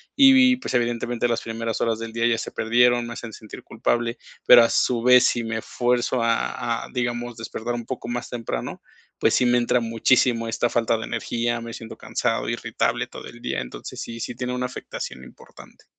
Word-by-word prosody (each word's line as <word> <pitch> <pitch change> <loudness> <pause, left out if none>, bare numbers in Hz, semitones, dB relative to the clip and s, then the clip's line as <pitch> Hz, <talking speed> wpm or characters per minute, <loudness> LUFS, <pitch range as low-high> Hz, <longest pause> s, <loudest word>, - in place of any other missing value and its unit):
y, 265 -2 +7
pues, 255 - -6
evidentemente, 120 0 0
las 115 - 0
primeras 115 0 -4
horas 115 -1 0
del 115 0 -6
día 115 +1 -1
ya 115 -1 +2
se - - -5
perdieron, 120 +1 +3
me 120 - -6
hacen 115 -1 -8
sentir 110 0 -11
culpable. 120 0 -1 0.3
Pero 120 -1 +9
a 115 - +2
su 120 -2 +1
vez, 125 0 +7
si 120 - +1
me 110 0 -2
esfuerzo 125 +1 0
a 115 0 -1
a, - - -14
digamos, 120 -1 -2
despertar 115 +1 -4
un 120 -1 -5
poco 125 -1 -6
más 120 0 -3
temprano, 115 - -5 0.4
pues - - +2
sí 125 - +3
me 120 0 +4
entra 120 +1 +2
muchísimo 115 +1 +2
esta 115 +1 0
falta 115 -1 +1
de 110 - -5
energía, 120 0 -2
me 115 0 -7
siento 115 -2 -8
cansado, - - -1
irritable - - -1
todo - - -10
el - - -12
día. - - -2
Entonces, - - -8
sí, 115 0 -7
sí 120 - -5
tiene 125 0 -3
una 125 0 -2
afectación 120 - -7
importante. - - -16
120 Hz, 200 wpm, -23 LUFS, 115-120 Hz, 0.4 s, Pero